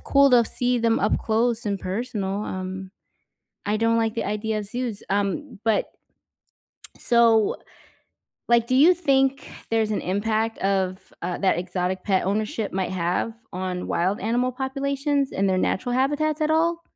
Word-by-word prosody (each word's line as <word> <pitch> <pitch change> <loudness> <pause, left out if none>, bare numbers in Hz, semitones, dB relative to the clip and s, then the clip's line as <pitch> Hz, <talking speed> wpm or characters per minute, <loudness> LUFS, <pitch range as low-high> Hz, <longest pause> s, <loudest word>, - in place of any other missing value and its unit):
cool 280 0 +4
to 240 -2 +6
see 245 +2 0
them 230 -1 +2
up 210 - +2
close 230 +1 0
and 200 -2 -2
personal, 200 0 -3
um, 185 0 -5 0.8
I 205 +1 +1
don't 230 +1 +2
like 225 -1 +1
the 230 - -2
idea 215 +1 -2
zoos, 230 0 -4
um, 205 +6 -2
but 220 -1 +1 1.1
so 230 -3 +3 0.9
like, 235 -1 +4
do 255 - 0
you 310 +8 +6
think 275 -5 +1 0.2
there's 220 -1 +1
an - - -1
impact 220 +4 -1
of, 190 -1 -1
uh, 175 +1 -3
that 190 -4 +2
exotic 180 +1 -2
pet 190 -3 +1
ownership 215 +1 -1
might 190 -1 -1
have 180 +4 -1 0.2
on 185 0 -3
wild 185 +5 0
animal 245 +3 0
populations 275 +2 -1
and 195 +1 +1
their 190 - +2
natural 245 +6 0
habitats 295 +4 +1
at 310 0 +1
all? 335 +2 +2
225 Hz, 150 wpm, -24 LUFS, 195-255 Hz, 1.1 s, to